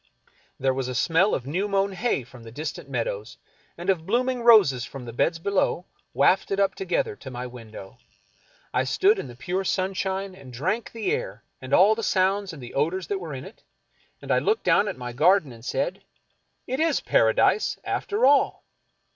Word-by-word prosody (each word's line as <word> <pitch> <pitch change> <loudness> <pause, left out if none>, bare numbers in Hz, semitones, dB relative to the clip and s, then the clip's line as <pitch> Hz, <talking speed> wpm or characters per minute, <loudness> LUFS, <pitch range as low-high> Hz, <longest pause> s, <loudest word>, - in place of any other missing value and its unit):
There 130 0 +1
was 130 -1 -3
a 125 - -4
smell 175 +8 +3
of 125 - -5
new 180 +9 -1
mown 200 0 +1
hay 190 - -1
from 120 +1 -14
the 115 0 -11
distant 145 +1 -6
meadows, 115 -4 -3 0.4
and 175 +2 -7
of 175 -4 0
blooming 250 +3 0
roses 205 - +6
from 130 0 -8
the 115 - -8
beds 165 +7 +1
below, 185 0 0 0.3
wafted 195 +1 +2
up 195 -1 +2
together 185 - -1
to 130 - -9
my 125 0 -6
window. 115 -2 -11 0.7
I - - +2
stood 405 +3 +3
in - - -5
the 120 - -11
pure 180 +9 -2
sun 190 0 -1
shine 190 0 -3
and 140 -8 -13
drank 185 - -2
the 230 - -2
air - - -3 0.2
and 130 0 -9
all 195 +8 +6
the 225 - -4
sounds 195 -1 +1
and 145 -6 -10
the 120 - -9
odors 170 +6 0
that 200 - -1
were 160 -6 -6
in 130 - -7
it; 210 - -13 0.6
and - - -4
I - - +4
looked 435 +1 0
down 210 - +3
at - - -4
my 125 -1 -6
garden 160 +2 +3
and 115 -1 -13
said: - - -2 0.3
" - - -47
It 260 +2 -3
is 325 +1 +2
Paradise, - - +2
after 415 -9 0
all." 280 +1 +3
180 Hz, 195 wpm, -25 LUFS, 130-200 Hz, 0.7 s, roses